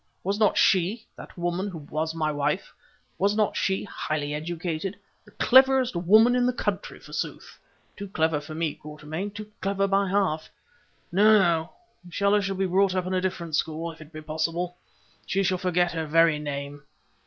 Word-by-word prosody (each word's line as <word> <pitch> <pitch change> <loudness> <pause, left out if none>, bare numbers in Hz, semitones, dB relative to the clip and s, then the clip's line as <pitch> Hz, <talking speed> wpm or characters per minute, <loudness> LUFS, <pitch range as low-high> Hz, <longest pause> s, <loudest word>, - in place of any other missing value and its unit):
Was 200 +3 -1
not 210 -2 +3
she—that 195 +4 0
woman 175 +3 -1
who 185 -4 -6
was 155 +2 -4
my 155 -2 0
wife—was 150 +6 -3
not 215 -1 +1
she 190 0 0
highly 150 -7 -3
educated?—the 170 +4 -5
cleverest 260 -2 +5
woman 215 +8 +5
in 250 0 +2
the 250 - +1
country - - -3
forsooth. - - -6 0.4
Too 200 - -7
clever 160 -4 0
for 155 +1 -9
me, 160 -2 -1
Quatermain—too 165 +8 -7
clever 195 0 0
by 195 0 +1
half! 185 -5 0 0.6
No, 215 +4 +6
no, 170 -4 +1 0.4
Stella 200 +2 +2
shall 195 0 -2
be 190 +1 0
brought 190 +1 +2
up 185 -1 0
in 185 - -3
a 185 - +1
different 170 -4 -2
school; 160 +2 -2
if 160 - -15
it 155 +1 -13
be 155 -1 -8
possible, 165 +3 -2 0.5
she 195 +1 +1
shall 185 -1 0
forget 180 -1 +1
her 160 -1 -3
very 165 0 +4
name. 145 -1 -5
175 Hz, 165 wpm, -26 LUFS, 160-200 Hz, 0.6 s, No